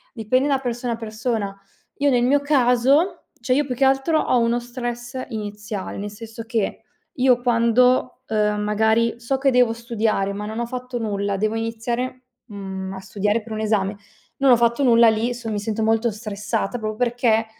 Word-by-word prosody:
dipende 255 +4 +1
da 275 -2 +2
persona 245 -1 -3
a - - -2
persona. 220 -2 -3 0.4
Io 285 0 +2
nel 245 -2 +3
mio 285 +3 +3
caso 275 +4 +2
cioè, 255 +1 +1
io 290 +2 +2
più 255 -2 -3
che 270 +2 +2
altro 270 +4 +2
ho 250 - +2
uno 235 +1 +2
stress 240 +1 -5
iniziale, 210 -3 -5
nel 205 +1 -4
senso 225 +2 -9
che 225 -3 -2 0.3
io 255 -2 +3
quando, 250 +2 +3
ehm, 210 -1 +1
magari 220 +2 +1
so 240 +3 -1
che 270 0 +2
devo 250 -2 +4
studiare 225 -4 -1
ma 210 +1 -5
non 220 +2 -5
ho 235 - -1
fatto 250 0 -5
nulla, 200 -3 -2
devo 215 +2 0
iniziare, 235 +3 -3 0.2
mhmm, 195 -3 -6
a 190 - -6
studiare 205 +3 -1
per 225 - -12
un 215 - -3
esame, 210 -2 0 0.4
non 275 -1 +4
ho 245 - +7
fatto 235 +3 +2
nulla. 235 -2 +6
Lì, 225 +3 0
son 235 -2 -5
mi 210 - -1
sento 220 +1 -2
molto 225 +1 +2
stressata, 210 +1 -3
proprio 215 -1 -3
perché 235 -2 +1
230 Hz, 185 wpm, -22 LUFS, 215-250 Hz, 0.4 s, ho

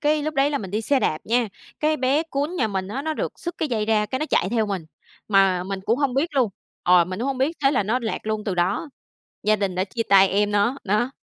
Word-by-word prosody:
cái 300 0 +2
lúc 310 +1 -3
đấy 275 +1 +3
là 285 - -1
mình 190 -3 -7
đi 215 +2 -1
xe 270 +4 +1
đạp 155 - 0
nha, 235 0 +1 0.3
cái 310 0 +2
bé 270 +4 +2
cún 290 +6 -2
nhà 225 -7 +1
mình 190 -1 -3
á, 265 +6 -4
nó 315 0 -2
được - - -3
sứt 345 -1 -4
cái 310 - -1
dây 215 -3 -1
ra 215 -1 +2
cái 260 +5 -3
nó 310 - -2
chạy 180 - +2
theo 225 -2 +1
mình, 195 -5 -3 0.4
mà 195 -3 +3
mình 195 0 -4
cũng 230 +3 +2
hông 280 -4 0
biết 290 +3 0
luôn 250 -6 +2 0.3
ờ, 180 -1 +5
mình 185 +2 -6
cũng 255 - -1
hông 270 -2 -2
biết, 305 +5 0
thế 275 - +6
là 255 - +2
nó 220 +5 0
lạc 220 - -2
luôn 215 -1 -2
từ 195 -4 -1
đó, 180 - 0 0.5
gia 215 0 +3
đình 195 -3 -2
đã 185 +1 0
chia 230 +4 -3
tay 195 -1 +7
em 205 +1 +1
nó, 205 +6 +2
đó. 215 +6 +1
225 Hz, 275 wpm, -23 LUFS, 195-275 Hz, 0.5 s, tay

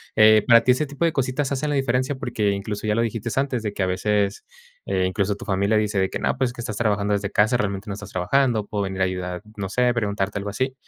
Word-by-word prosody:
eh, 110 -1 +6
para 115 -1 +7
ti 125 - +4
ese 130 +5 +1
tipo 145 +3 -5
de 165 - +3
cositas 135 +1 -1
hacen 140 +2 -1
la 145 - 0
diferencia, 130 +1 0
porque 120 -6 -1
incluso 105 +1 -4
ya 105 - +2
lo 115 - +2
dijiste 115 0 -2
antes, 135 -4 0
de 105 -2 -3
que 100 - -1
a - - +2
veces, 100 +2 0 0.4
eh, 95 - 0
incluso 100 +1 0
tu - - -10
familia 100 +2 +1
dice 105 -2 +1
de 95 - +1
que - - -3
no, - - 0
pues 130 -2 0
que 120 - -7
estás 110 -3 -5
trabajando 105 -3 0
desde 100 -1 -1
casa, 110 +4 +3
realmente 100 -2 -3
no 100 - -2
estás 105 0 -8
trabajando, 110 +4 +1
puede 105 -1 -2
venir 95 0 -4
a - - +5
ayudar, 90 -1 -3 0.2
no 100 -2 -3
sé, 125 +4 +2
preguntarte 100 -3 -1
algo 100 +1 -4
así, 130 +5 -2
105 Hz, 260 wpm, -23 LUFS, 100-125 Hz, 0.4 s, para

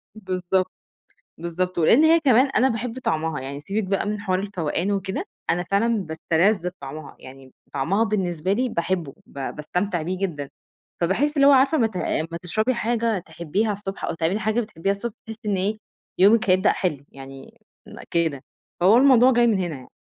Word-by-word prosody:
بالضبط، 185 -2 -1 0.7
بالضبط، 175 +2 -3
ولإن 225 - +5
هي 330 +1 +6
كمان 265 -3 +4
أنا 265 -1 +2
باحب 230 +1 -4
طعمها، 160 - -1
يعني 140 +2 -6
سيبِك 200 +8 -2
بقى 195 0 -1
من 210 0 -2
حوار 185 -3 0
الفوقان 190 -1 -2
وكده، 195 -1 -2 0.2
أنا 175 +1 +1
فعلًا 200 +5 +1 0.2
باستلذ 175 +4 +1
بطعمها، 155 -4 -10
يعني 135 +1 -12
م 130 - -21 0.2
طعمها 195 +11 +1
بالنسبة 190 -4 -1
لي 250 +4 0
باحبه 170 - -2
با 135 -1 -6
باستمتع 180 +4 -2
بيه 180 +3 -3
جدًا، 150 -8 -3 0.5
فباحس 250 - +1
اللي 280 -1 +5
هو 285 - +8
عارفة 270 +3 +4
أمّا 230 -5 +3
ت 205 - -15
أمّا 165 -1 -2
تشربي 215 +8 0
حاجة 230 -2 0
تحبيها 180 +5 -2
الصبح، 195 -1 -5
أو - - -2
تعملي 170 +5 0
حاجة 220 +2 0
بتحبيها 195 -4 -2
الصبح، 205 +3 -4
تحسّي 225 0 -8
إن 195 - +1
إيه، 205 +4 -1 0.4
يومِك 205 +2 +5
هيبدأ 185 +1 +4
حلو، 150 -7 -2
يعني 135 0 -12 0.3
م - - -11
كده، 160 -6 0 0.4
فهو 195 +6 +6
الموضوع 255 -1 +6
جاي 240 0 +4
من 215 -4 +2
هنا 175 -4 -2
يعني. 130 -2 -12
190 Hz, 180 wpm, -23 LUFS, 165-220 Hz, 0.7 s, هو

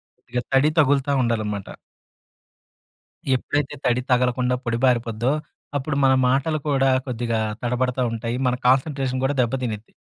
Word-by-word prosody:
కొద్దిగా 125 +1 -4
తడి 135 +3 +5
తగులుతా 140 -1 +3
ఉండాలన్నమాట. 110 -4 -2 1.7
ఎప్పుడైతే 145 +2 -1
తడి 125 0 +2
తగలకుండా 125 0 +2
పొడి 115 0 -1
బారిపోద్దో, 120 0 +1 0.4
అప్పుడు 140 +1 -2
మన 135 - +5 0.2
మాటలు 140 +5 +1
కూడా 135 -2 +3 0.2
కొద్దిగా 115 -2 -2 0.2
తడబడతా 125 +1 0
ఉంటాయి. 115 +1 -3
మన 125 - +1
కాన్సంట్రేషన్ 130 -1 +1
కూడా 140 +1 0
దెబ్బ 120 +1 -1
తినిద్ది. 110 -2 -5
125 Hz, 125 wpm, -23 LUFS, 120-135 Hz, 1.7 s, తడి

